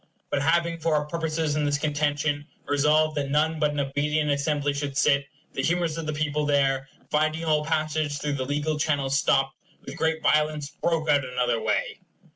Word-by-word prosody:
But 140 - +1
having, 170 +2 +1
for 160 -1 +1
our 150 0 +1
purposes 160 -1 -1
in 150 - 0
this 145 -1 +1
contention, 145 0 -1 0.2
resolved 150 +2 +2
that 140 -1 -1
none 155 +2 +1
but 150 -1 +3
an 145 0 -3
obedient 150 +2 0
Assembly 145 0 0
should 140 -1 -3
sit, 140 -1 +3 0.3
the - - -2
humors 170 0 0
of 165 -2 -5
the - - 0
people 150 0 -1
there, 135 -2 +1 0.2
finding 155 +2 +1
all 155 -1 +2
passage 155 -1 -1
through 145 -1 -2
the 130 -2 -2
legal 150 +2 -1
channel 145 -3 0
stopped, 135 0 +2 0.3
with 135 +4 -8
great 160 -1 0
violence 150 -1 +1
broke 165 0 -1
out 145 -2 +4
another 125 -3 -1
way. - - -1
150 Hz, 185 wpm, -26 LUFS, 145-155 Hz, 0.3 s, out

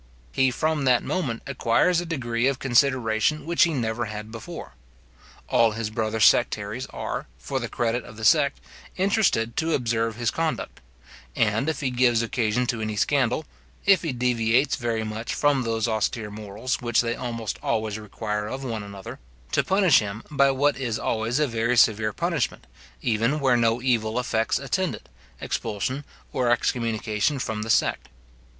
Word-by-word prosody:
He 130 0 +3
from 155 +3 0
that 125 -2 +4
moment 135 -11 -2
acquires 140 +6 +2
a 175 - -7
degree 120 -6 -1
of 135 -1 +1
consideration 130 +1 +2
which 170 +1 +4
he 165 - -1
never 115 -2 -1
had 105 0 -7
before. 115 -1 -8 0.7
All 115 -2 +3
his 110 -1 -3
brother 110 0 -2
sectaries - - +2
are, - - -5
for 135 - -3
the 120 -3 -4
credit 120 +1 -1
of 110 - -12
the 110 - -4
sect, 140 +4 +4 0.4
interested 185 - +2
to 160 0 +1
observe 115 -3 0
his 120 -1 0
conduct; 165 -1 -3 0.6
and, 110 +7 +1
if 160 - -3
he 130 -2 0
gives 120 -2 +3
occasion 115 +1 0
to 120 -2 -2
any 110 -1 -2
scandal, 135 +5 +1 0.4
if 195 -2 +5
he 165 - -2
deviates 125 +1 +2
very 115 -3 -2
much 110 +1 -4
from 145 -2 +2
those 115 -1 -1
austere 110 -1 -1
morals 105 +5 -4
which 120 -1 +2
they 120 0 -1
almost 115 -4 -4
always 110 -1 -1
require 105 0 -4
of 130 +4 -5
one 115 -4 -3
another, 100 -1 -9 0.3
to - - +2
punish 190 -5 +4
him 105 +1 -5
by 140 -1 +4
what 140 +2 +2
is 120 -4 -1
always 115 +3 -1
a 150 - +3
very 120 -1 0
severe 110 -1 +4
punishment, 170 -1 -2 0.4
even 115 +6 +1
where 135 -3 +3
no 115 0 +2
evil 115 -3 +1
effects 115 -2 0
attend 145 +7 -1
it, - - -15 0.3
expulsion 115 +6 -3 0.3
or 125 -2 +1
excommunication 115 +1 0
from 110 -4 -3
the 110 - -5
sect. - - +1
120 Hz, 165 wpm, -25 LUFS, 110-135 Hz, 0.7 s, if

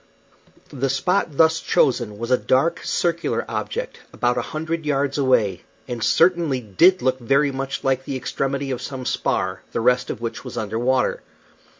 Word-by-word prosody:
The 135 0 -1
spot 155 +2 0
thus 160 0 +4
chosen 120 -5 +1
was 115 +3 -4
a 125 - +5
dark, 160 +6 +2
circular 170 -1 -1
object, - - -4
about 120 0 0
a - - 0
hundred 160 +1 -4
yards 140 -1 0
away, 115 -9 +2 0.3
and 120 -2 -4
certainly 155 +4 +3
did 165 - +3
look 130 0 +1
very 140 +4 +2
much 135 +1 -4
like 130 0 0
the 135 - -4
extremity 135 +1 -2
of 125 - -3
some 130 -2 -6
spar, - - -1
the - - 0
rest 125 +2 +2
of - - -4
which 115 -1 -5
was - - -8
under 110 +1 -2
water. 130 +1 +1
135 Hz, 170 wpm, -22 LUFS, 125-150 Hz, 0.3 s, a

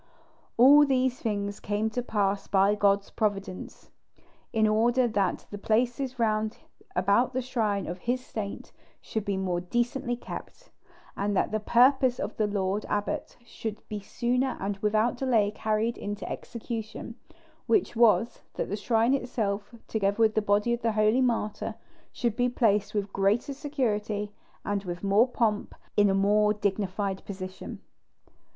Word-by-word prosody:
All 280 +5 +8
these 260 -2 +1
things 205 -3 -2
came 210 +2 -1
to 245 - -1
pass 205 -4 -1
by 195 +1 +4
God's 200 -1 +2
providence, 200 -4 -3 0.6
in 220 -1 +3
order 235 +4 +3
that 200 -5 0
the 205 - -6
places 245 +4 0
round 215 -1 0 0.4
about 200 +8 +2
the 260 - 0
shrine 215 -6 -1
of 180 +2 -5
His 250 +5 -2
saint 205 -3 -6 0.3
should 220 - -4
be 200 -1 -1
more 180 -2 -1
decently 240 +5 -1
kept, - - -9 0.4
and 200 0 -1
that - - +1
the 215 - 0
purpose 250 +3 +4
of 205 - -3
the 215 - +2
lord 200 0 -1
abbot 205 0 -2
should 220 -2 -7
be 210 - -3
sooner 250 +5 -1
and 195 0 -2
without 215 +4 +1
delay 230 -6 +2
carried 215 +2 -1
into 205 -1 -5
execution; 230 -1 -6 0.5
which 230 +1 +2
was, 230 0 +3
that - - -3
the 205 - -1
shrine 225 +4 +2
itself, 220 -5 -2
together 200 -2 0
with 220 -1 +4
the 215 - +2
body 210 +3 +2
of 235 - -2
the 230 -1 +1
holy 215 +4 +3
martyr, 230 -4 -1 0.4
should 235 -3 -1
be 245 0 +2
placed 215 -4 +1
with 200 -1 -2
greater 205 +8 +1
security, 215 -8 -2 0.3
and 205 -1 -1
with 175 -1 -6
more 200 +5 +4
pomp, 225 -4 -1 0.2
in 205 -1 +5
a 195 - +2
more 210 +2 +3
dignified 200 -1 -2
position. 185 -1 -7
215 Hz, 150 wpm, -28 LUFS, 200-240 Hz, 0.6 s, All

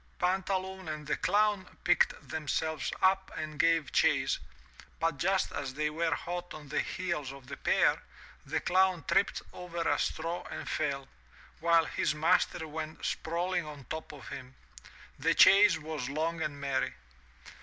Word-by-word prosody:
Pantaloon 190 0 -1
and 155 -1 -5
the 150 - 0
Clown 205 -1 +1
picked 175 -4 +2
themselves 160 +2 -2
up 190 0 +3
and 155 -1 -5
gave 165 -3 +3
chase, - - +3 0.6
but 165 -4 0
just 190 +2 +1
as 140 -2 -4
they 150 +1 0
were 160 -1 0
hot 175 +1 -5
on 150 -1 -10
the 150 - 0
heels 170 -7 -2
of 135 -1 -12
the 140 +1 -7
pair, - - +3 0.4
the - - -1
Clown 185 -2 +2
tripped 200 - +2
over 170 -2 -4
a 145 -2 +2
straw 165 +2 -2
and - - -6
fell, 140 -3 -1 0.5
while 165 0 +4
his 150 - 0
master 160 +1 +2
went 155 0 -6
sprawling 175 +2 -1
on 145 -2 -9
top 160 0 -5
of 145 -4 -11
him. 130 -1 -8 0.6
The - - +2
chase 200 -3 +7
was 155 -5 -5
long 160 +3 -1
and 150 -2 -3
merry. 140 -1 -1
160 Hz, 155 wpm, -31 LUFS, 150-180 Hz, 0.6 s, chase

